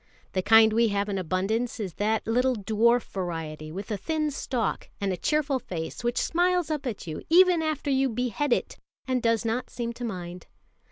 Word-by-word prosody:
The 185 - +1
kind 220 +2 +6
we 230 +1 +4
have 200 0 -1
in 195 -1 -1
abundance 195 +8 -1
is 195 -5 -4
that 215 +4 0
little 250 +3 +2
dwarf 225 +3 +2
variety 160 -4 -5
with 195 +6 -6
a 210 - -1
thin 305 - -1
stalk, 255 -4 -2
and 200 -2 0
a - - -1
cheerful 290 - 0
face 170 -1 -6
which 240 +1 -1
smiles 355 -1 +1
up 295 -3 -2
at 225 -6 -5
you 155 -2 -5
even 355 0 +6
after 310 -2 -1
you 270 0 +2
behead 250 +4 -1
it, - - 0 0.3
and 255 -1 0
does 230 0 +1
not 230 +3 -1
seem 235 -1 -4
to 245 - -8
mind. 180 -5 -6
230 Hz, 190 wpm, -27 LUFS, 195-265 Hz, 0.3 s, kind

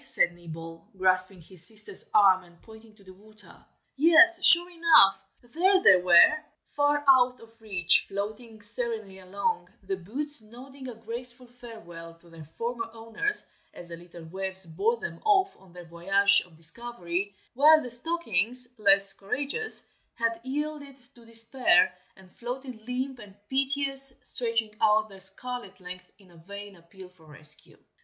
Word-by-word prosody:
said 175 - +2
Nibble, 165 +2 -12
grasping 185 0 0
his 180 +1 +2
sister's 215 -1 0
arm, 195 -3 +4
and 170 -1 -22
pointing 220 -1 -17
to 205 - -23
the 190 -1 -16
water. 210 +2 -13 0.3
Yes, 340 +4 +4
sure 345 0 +8
enough, 330 - +4 0.2
there 360 +10 +2
they 185 - +6
were. 180 - +5 0.4
Far 290 0 0
out 255 -2 +3
of 230 0 -20
reach, 185 -5 0
floating 215 +2 -8
serenely 220 -3 -5
along, 190 +2 -4
the 195 0 -5
boots 270 - +1
nodding 260 +5 -14
a 245 - -9
graceful 240 +3 -6
farewell 220 -9 -13
to 170 0 -23
their 165 -2 -13
former 235 0 -5
owners 230 - -4 0.3
as 175 - -13
the 170 - -8
little 170 0 -15
waves 190 +2 -4
bore 435 - -2
them - - -8
off 395 -3 +1
on 190 -2 -21
their 175 0 -13
voyage 195 +4 +3
of 170 - -22
discovery, 185 +1 -4 0.2
while 310 +4 +5
the 250 - -9
stockings, 245 - -1
less 195 -1 +4
courageous, 280 - 0 0.3
had 230 -1 -3
yielded 285 0 -6 0.2
to 235 -3 -20
despair, 230 -4 +2 0.2
and 190 -1 -20
floated 245 -1 -9
limp 255 +1 -5
and 205 -3 -15
piteous, 275 0 +3
stretching 230 -3 -3
out 215 0 +2
their 195 -1 -15
scarlet 220 0 -7
length 180 0 -11
in 195 -3 -23
a 170 - -20
vain 200 +4 -12
appeal 180 +2 -16
for 180 -3 -24
rescue. 150 0 -3
220 Hz, 150 wpm, -25 LUFS, 185-255 Hz, 0.4 s, sure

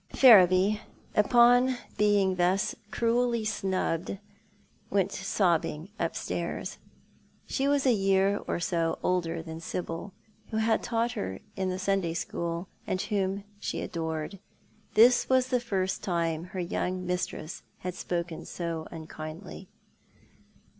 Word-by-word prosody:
Ferriby, 200 -3 +7 0.3
upon 245 +3 +5 0.2
being 200 -3 +3
thus 180 +2 +2 0.2
cruelly 235 0 +1
snubbed, 190 -4 -1 0.7
went 195 -1 +1
sobbing 175 -4 0
upstairs. - - -3 0.7
She 270 0 -1
was 285 -1 +2
a 255 - +6
year 195 0 +2
or - - -1
so 165 -1 0
older 170 -2 0
than 160 0 -7
Sibyl, 165 +2 -5 0.4
who 220 - -2
had 220 0 +2
taught 235 0 0
her 95 0 -4 0.2
in 190 -1 -1
the 185 - -2
Sunday 190 -3 0
School, 170 +1 -3 0.2
and 185 - -1
whom 195 0 -1 0.2
she - - -3
adored. 160 +2 -4 0.6
This 240 +3 +6
was 260 -1 +3
the 250 -1 +2
first 195 -5 -1
time 170 -2 -1
her 185 +1 -6
young 180 +1 -2
mistress 180 -2 -3 0.2
had 180 0 -3
spoken 170 -2 -3
so 165 -2 -4
unkindly. 160 +3 -8
185 Hz, 120 wpm, -29 LUFS, 170-215 Hz, 0.7 s, Ferriby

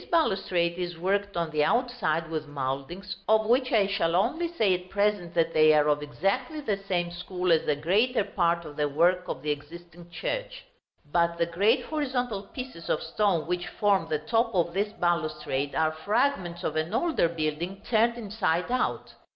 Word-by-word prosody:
This - - -16
balustrade 185 - +1
is 175 -2 -4
worked 200 +2 -1
on 165 -2 -1
the 150 -1 +2
outside 220 -9 0
with 155 -1 -3
mouldings, 145 +8 -4
of 220 0 +4
which 255 +4 +2
I 215 -5 +4
shall 195 -4 0
only 260 - +1
say 220 - +2
at 180 0 -4
present 200 -4 0
that 165 -1 +2
they 155 0 +6
are 150 0 +4
of 150 0 +2
exactly 200 - -1
the 215 -9 -1
same 175 -2 0
school 180 +1 -2
as 160 -1 +4
the 150 - +2
greater 205 - +2
part 170 -4 0
of 150 -1 -10
the 150 -1 +1
work 175 +5 +2
of 130 - -5
the 150 - 0
existing 170 +4 -9
church. - - -4 0.5
But 170 0 +2
the 170 - +2
great 185 +6 +2
horizontal 255 -8 -2
pieces 250 -10 -8
of - - 0
stone 175 0 +1
which 175 0 -2
form 200 -5 +1
the 155 - +1
top 225 +10 +1
of 170 -1 +1
this 205 +2 0
balustrade 155 -5 -1
are 160 0 +2
fragments 180 - -1
of 155 - -2
an 160 +7 -1
older 310 - +2
building 170 +4 -3
turned 235 +1 +3
inside 205 -4 -1
out. 255 - -1
180 Hz, 185 wpm, -27 LUFS, 160-215 Hz, 0.5 s, they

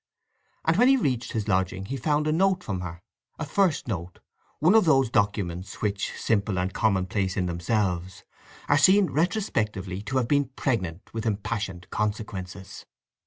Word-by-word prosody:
And 160 +2 +3
when 245 +3 +6
he 270 0 +6
reached 125 - -1
his 110 -2 -2
lodging 95 -1 0
he 130 - -4
found 150 +3 0
a 155 - +1
note 185 +2 +2
from 95 -3 -3
her—a 90 - -9
first 180 -2 +1
note—one 100 - -2
of 220 -3 +6
those 135 -6 +3
documents 100 -4 -1
which, 100 -1 -1
simple 105 -3 0
and 90 +1 -1
commonplace 95 -2 0
in 95 - +1
themselves, 90 +1 -1 0.4
are 145 - +4
seen 190 +4 +5
retrospectively 105 - -1
to 130 +5 -2
have 125 -3 +1
been 145 +1 +3
pregnant 95 -9 -2
with 115 0 -3
impassioned 100 -3 -3
consequences. 100 -3 -4
105 Hz, 150 wpm, -26 LUFS, 95-145 Hz, 0.4 s, when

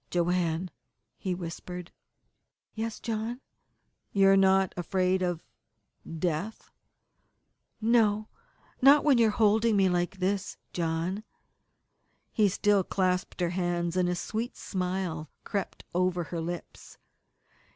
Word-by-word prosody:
"Joanne," 175 0 0 0.4
he 185 -2 -3
whispered. 175 0 -7 0.8
"Yes, 225 0 -4
John." 230 +2 -3 0.7
"You 195 -1 +5
are 195 - +7
not 190 -1 +4
afraid 185 +1 +1
of 175 -2 -1 0.7
death?" 175 +6 -3 1.1
"No, 215 -2 +3 0.5
not 280 +3 +7
when 280 -5 +4
you 230 - +6
are - - +3
holding 215 0 +3
me 190 -1 +4
like 175 +2 -1
this, 195 +1 -1 0.2
John." 170 +4 -1 1.1
He 210 -3 +3
still 200 0 +2
clasped 185 0 -1
her 175 -1 +1
hands, 175 -1 -1
and 180 -1 +2
a 180 - 0
sweet 225 +7 -4
smile 180 -5 -3
crept 200 -2 -4
over 180 0 +1
her 165 +1 -4
lips. 175 +1 -7
185 Hz, 115 wpm, -29 LUFS, 175-210 Hz, 1.1 s, are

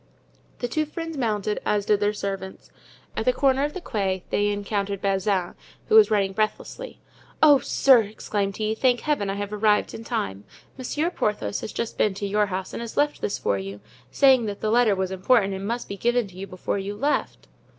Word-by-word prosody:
The 245 - -2
two 310 +5 -1
friends 325 +1 -6
mounted, 215 -5 -1
as 205 -1 0
did 210 -1 +3
their 205 0 +2
servants. 195 -2 -6 0.4
At - - -1
the - - +5
corner 275 - +2
of 295 - -4
the 375 - -5
Quai 190 - -2
they 205 - +2
encountered 200 -1 -2
Bazin, 195 -2 0 0.4
who 435 - +4
was 440 -1 +8
running 200 -2 +1
breathlessly. 215 - -3 0.4
"Oh, 290 -3 +7
sir!" 260 -3 +5
exclaimed 205 -1 -3
he, 215 0 0
"thank 245 +1 +2
Heaven 290 -10 0
I 195 - -2
have 205 +1 -4
arrived 210 0 +2
in 225 - -7
time. 100 - -3 0.3
Monsieur 295 +6 -2
Porthos 105 - -2
has - - -5
just 235 - -4
been 205 -3 +2
to 200 - -4
your 205 +1 +1
house 190 0 -4
and - - -4
has 235 -1 -7
left 295 0 +1
this - - -1
for 100 - 0
you, 100 +1 -7 0.3
saying 260 - +4
that 205 -1 -5
the 215 - -1
letter 235 -3 +4
was 190 0 -2
important 195 +1 +2
and 195 +1 -5
must 235 +2 -3
be 200 - -6
given 240 +2 +1
to 180 - -16
you 195 +1 -7
before 185 +2 -3
you 200 +1 -4
left." 285 +7 -1
210 Hz, 205 wpm, -24 LUFS, 195-245 Hz, 0.4 s, was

